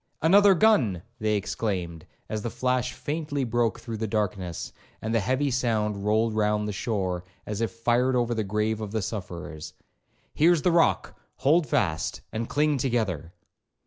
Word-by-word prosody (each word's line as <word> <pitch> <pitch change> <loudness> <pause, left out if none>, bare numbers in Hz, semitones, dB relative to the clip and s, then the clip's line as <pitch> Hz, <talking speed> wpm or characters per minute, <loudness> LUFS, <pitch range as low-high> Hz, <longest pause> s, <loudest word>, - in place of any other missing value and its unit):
'Another 195 +4 +6
gun!' 130 - +3 0.2
they 110 0 +1
exclaimed, 90 -5 -3 0.2
as 110 -1 -3
the 120 - -3
flash 125 +1 0
faintly 150 -2 -3
broke 120 -1 0
through 115 -2 -6
the 110 +1 -2
darkness, 100 -5 -2 0.3
and 110 +1 -3
the 115 - +3
heavy 130 +6 0
sound 110 -5 0
rolled 110 +1 +2
round 105 0 +1
the - - -2
shore, 95 -4 -2 0.2
as 105 +1 -4
if 115 - +1
fired 120 +3 +1
over 120 -1 +1
the 110 -2 -1
grave 105 +2 -1
of 105 -2 -5
the 110 - 0
sufferers. 85 -8 -6 0.6
'Here's 165 0 +4
the 180 - +4
rock, 170 -1 +2 0.2
hold 150 +4 +3
fast, 80 -3 0
and 115 +1 -3
cling 150 -1 +2
together.' 110 - -1
110 Hz, 160 wpm, -26 LUFS, 105-130 Hz, 0.6 s, Another